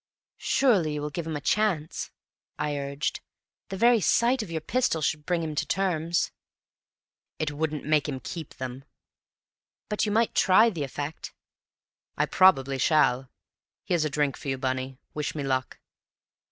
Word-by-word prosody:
"Surely 190 - +2
you 150 - -3
will 150 - -3
give 165 +2 -4
him 160 - -3
a - - -2
chance!" 180 -5 0 0.5
I 150 -1 -1
urged. 140 0 -3 0.5
"The 195 - -4
very 235 +1 +5
sight 240 +7 +3
of 215 - -6
your 165 -1 -2
pistol 225 +2 0
should 150 -1 -1
bring 175 -2 +1
him 155 -1 -3
to 150 - -1
terms." 170 -3 0 1.1
"It 155 -1 -1
wouldn't 155 0 -3
make 150 -1 +2
him 135 -2 -4
keep 160 +3 -7
them." 130 +1 -6 1.1
"But 210 - 0
you - - 0
might 225 +2 +2
try 215 +5 +5
the 165 -7 -3
effect?" 145 +3 -6 0.8
"I - - +3
probably 135 -8 +4
shall. 130 -4 +3 0.5
Here's 175 -3 +1
a 155 - 0
drink 145 -1 0
for 150 - -9
you, 135 -1 -1
Bunny. 130 0 -3 0.2
Wish 150 0 -3
me 145 - -3
luck." 130 -2 -1
155 Hz, 160 wpm, -27 LUFS, 140-185 Hz, 1.1 s, very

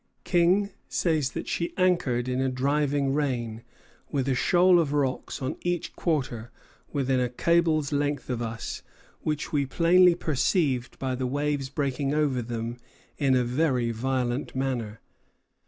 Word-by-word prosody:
King 185 +3 +3 0.2
says 155 -6 0
that - - -5
she 170 - -2
anchored 155 -10 +2
in 130 +1 0
a 135 - +1
driving 140 +1 +1
rain, 120 -6 -1 0.5
"with 135 -2 -1
a 135 - +2
shoal 175 +7 +4
of 150 -4 0
rocks 140 -1 -1
on 130 - -3
each 175 -1 -2
quarter 125 -8 -2 0.4
within 135 -3 +1
a 125 -1 0
cable's 155 +2 +2
length 145 -1 -1
of 125 -2 -2
us, 115 -1 -5 0.4
which 150 0 -3
we 145 -1 +2
plainly 175 +4 +5
perceived 145 -5 0
by 130 -1 -2
the 130 0 -2
waves 145 0 -1
breaking 140 0 -1
over 145 -5 +1
them 115 0 -4 0.4
in 135 -3 +3
a 125 - +3
very 125 -2 +1
violent 125 +2 -2
manner." 125 -5 -2
135 Hz, 145 wpm, -27 LUFS, 125-155 Hz, 0.5 s, plainly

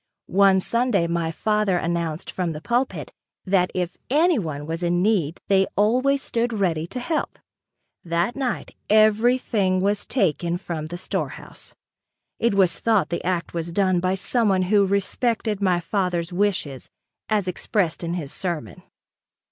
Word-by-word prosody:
One 195 0 +4
Sunday 235 -3 +1
my 170 -1 -1
father 210 +1 +1
announced 170 -1 -2
from 175 -3 -2
the 150 - -6
pulpit 240 +9 -1 0.3
that 185 -1 +2
if 180 -1 -2
anyone 235 - +1
was 165 +2 -4
in 175 0 +1
need 185 -7 +1
they 195 -1 +3
always 255 +7 +2
stood 235 +1 -1
ready 170 -6 0
to 250 - -5
help. 310 +5 -2 0.7
That 170 +6 -1
night 265 -3 -3
everything 215 -2 +3
was 200 +2 0
taken 175 - 0
from 165 -4 -5
the 175 +2 -6
storehouse. 185 - -5 0.6
It 230 -3 +2
was 185 -4 +3
thought 220 -4 +2
the 170 - -3
act 175 -1 -2
was 170 0 -3
done 185 -1 +2
by 185 +1 0
someone 195 -2 +1
who 200 -2 +5
respected 210 +2 0
my 185 -3 +2
father's 180 -1 -2
wishes 175 -9 -1 0.4
as 210 -4 +1
expressed 180 -1 -1
in 170 +1 -2
his 150 -6 -5
sermon. 170 - -4
190 Hz, 145 wpm, -23 LUFS, 170-215 Hz, 0.7 s, who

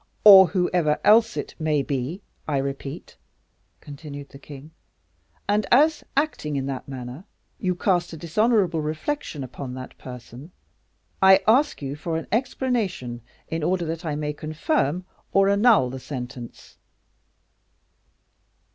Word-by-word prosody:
"Or 195 -3 +10
whoever 175 -3 +1
else 225 +2 +5
it - - -4
may 155 -3 +1
be, 140 +7 -3 0.3
I 145 -3 0
repeat," 135 - -5 0.6
continued 145 -1 -9
the 140 - -13
king; 145 +2 -12 0.8
"and 205 0 +1
as, 300 +5 +4
acting 280 - 0
in 135 -1 -1
that 135 -2 -5
manner, 130 +3 -7 0.4
you 180 -1 0
cast 175 -2 0
a 165 - -7
dishonorable 185 0 +1
reflection 155 - -3
upon 130 0 -7
that 130 0 -9
person, 125 +5 -10 0.7
I 190 0 +7
ask 255 - +3
you 135 +1 -4
for 160 +2 -3
an 165 - -5
explanation, 220 - -1 0.3
in 165 0 -3
order 175 +2 0
that 165 +2 -4
I 155 -3 -2
may 150 0 -3
confirm 155 - -1 0.3
or 195 0 +4
annul 200 - +4
the 130 - -6
sentence." 125 -3 -8
160 Hz, 130 wpm, -24 LUFS, 140-195 Hz, 0.8 s, Or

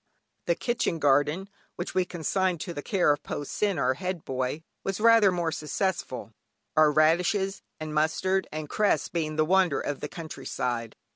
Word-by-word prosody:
The - - +3
kitchen 240 -8 -1
garden, 145 +5 +2 0.3
which 175 - -5
we 185 -1 +2
consigned 180 +1 -1
to 175 - -4
the 145 - -5
care 180 -4 +3
of 145 - -6
Po 145 - -4
Sin, 200 +5 -1
our 130 -1 +2
head 180 +3 -4
boy, 130 +4 -2 0.2
was 195 0 -2
rather 225 -3 +6
more 170 -2 -1
successful, 155 - -3 0.4
our 155 -1 +6
radishes, 180 +6 +2 0.2
and 155 -1 -5
mustard 185 +5 +1
and 155 0 -5
cress 210 +6 +1
being 155 -3 -2
the 155 0 +3
wonder 180 -3 +3
of 145 -2 -3
the 150 - -5
country 160 -5 -8
side. 115 -2 -2
160 Hz, 170 wpm, -27 LUFS, 150-190 Hz, 0.4 s, rather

